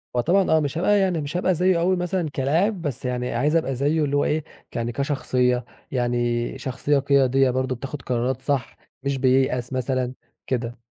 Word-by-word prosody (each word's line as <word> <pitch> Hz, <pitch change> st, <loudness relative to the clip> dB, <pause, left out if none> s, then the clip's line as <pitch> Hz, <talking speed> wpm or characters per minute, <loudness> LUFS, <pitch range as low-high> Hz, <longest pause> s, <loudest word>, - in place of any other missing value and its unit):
هو 120 Hz, -, +3 dB
طبعًا 190 Hz, +7 st, +2 dB
آه، 160 Hz, -, +5 dB
مش 145 Hz, +1 st, -2 dB
هاب 175 Hz, -, -1 dB
يعني 190 Hz, -5 st, +3 dB
مش 145 Hz, +5 st, -3 dB
هابقى 185 Hz, 0 st, +2 dB
زيّه 180 Hz, +1 st, +3 dB
أوي 185 Hz, +2 st, +2 dB
مثلًا 180 Hz, -2 st, -1 dB
كلاعب، 165 Hz, +9 st, 0 dB
بس 135 Hz, -5 st, -3 dB
يعني 125 Hz, -1 st, -2 dB
عايز 145 Hz, +7 st, +1 dB
أبقى 145 Hz, -5 st, +1 dB
زيّه 145 Hz, +5 st, +1 dB
اللي 145 Hz, -1 st, 0 dB
هو 145 Hz, -, +2 dB
إيه 155 Hz, 0 st, 0 dB, 0.3 s
ك -, -, -19 dB
يعني 120 Hz, 0 st, -1 dB
كشخصية، 125 Hz, -2 st, 0 dB, 0.3 s
يعني 120 Hz, 0 st, 0 dB
شخصية 135 Hz, +2 st, 0 dB
قيادية 135 Hz, -1 st, +3 dB
برضه 130 Hz, +1 st, -1 dB
بتاخد 135 Hz, +3 st, -6 dB
قرارات 125 Hz, +1 st, -1 dB
صح، 135 Hz, -2 st, -2 dB, 0.3 s
مش 140 Hz, 0 st, -1 dB
بييأس 130 Hz, -1 st, +2 dB
مثلًا، 130 Hz, 0 st, -1 dB, 0.3 s
كده. 120 Hz, -1 st, -2 dB
135 Hz, 185 wpm, -23 LUFS, 125-155 Hz, 0.3 s, آه